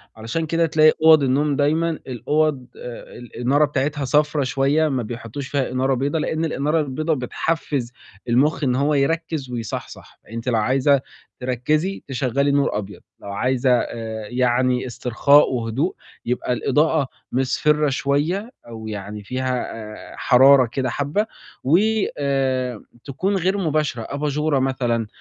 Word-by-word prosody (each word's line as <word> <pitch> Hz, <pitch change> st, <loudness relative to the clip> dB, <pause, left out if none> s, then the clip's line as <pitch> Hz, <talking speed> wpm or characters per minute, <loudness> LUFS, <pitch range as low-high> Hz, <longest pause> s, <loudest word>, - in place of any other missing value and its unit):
علشان 115 Hz, +9 st, -3 dB
كده 165 Hz, +1 st, +1 dB
تلاقي 155 Hz, 0 st, +5 dB
أُوَض 160 Hz, -3 st, +7 dB
النوم 140 Hz, +2 st, +1 dB
دايمًا 155 Hz, +4 st, +2 dB, 0.2 s
الأُوَض 130 Hz, +2 st, 0 dB
آآ 120 Hz, -1 st, -9 dB
الإنارة 125 Hz, +5 st, +1 dB
بتاعتها 145 Hz, 0 st, -2 dB
صفرا 150 Hz, +1 st, +2 dB
شوية، 140 Hz, +4 st, +2 dB
ما 130 Hz, -3 st, -1 dB
بيحطّوش 120 Hz, +4 st, -6 dB
فيها 135 Hz, -3 st, -1 dB
إنارة 130 Hz, +1 st, +1 dB
بيضا، 140 Hz, +5 st, -1 dB
لإن 160 Hz, +1 st, -1 dB
الإنارة 150 Hz, +1 st, 0 dB
البيضا 155 Hz, +3 st, -1 dB
بتحفِّز 135 Hz, -1 st, -2 dB, 0.4 s
المُخ 145 Hz, +6 st, +2 dB
إن 125 Hz, -2 st, +2 dB
هو 145 Hz, +3 st, +1 dB
يركِّز 155 Hz, -1 st, -1 dB
ويصَحْصَح. 115 Hz, -2 st, -7 dB
أنتِ 115 Hz, +2 st, -7 dB
لو 115 Hz, -, +1 dB
عايزة 135 Hz, +4 st, +3 dB, 0.4 s
تركِّزي، 150 Hz, +9 st, -1 dB
تشغّلي 135 Hz, +2 st, 0 dB
نور 140 Hz, -6 st, +1 dB
أبيض، 105 Hz, -1 st, -7 dB, 0.2 s
لو -, -, -10 dB
عايزة 130 Hz, +5 st, 0 dB
آآ 110 Hz, -3 st, -2 dB
يعني 125 Hz, 0 st, +1 dB
استرخاء 125 Hz, +5 st, +3 dB
وهدوء، 120 Hz, +8 st, -1 dB, 0.3 s
يبقى 125 Hz, +1 st, -1 dB
الإضاءة 150 Hz, +3 st, +1 dB, 0.2 s
مِصْفِرة 150 Hz, +3 st, +1 dB
شوية 150 Hz, -, -1 dB, 0.2 s
أو 110 Hz, -1 st, -8 dB
يعني 105 Hz, 0 st, -6 dB
فيها 130 Hz, +2 st, -2 dB, 0.4 s
آآ -, -, -11 dB
حرارة 135 Hz, 0 st, +6 dB
كده 130 Hz, -2 st, -1 dB
حبّة 145 Hz, -, -1 dB, 0.4 s
وآآ 135 Hz, -, +1 dB, 0.2 s
تكون 185 Hz, +9 st, -2 dB
غير 190 Hz, +2 st, +1 dB
مباشرة، 155 Hz, -8 st, -1 dB
أباجورة 150 Hz, 0 st, 0 dB
مثلًا. 120 Hz, -4 st, 0 dB
135 Hz, 135 wpm, -22 LUFS, 125-150 Hz, 0.4 s, أُوَض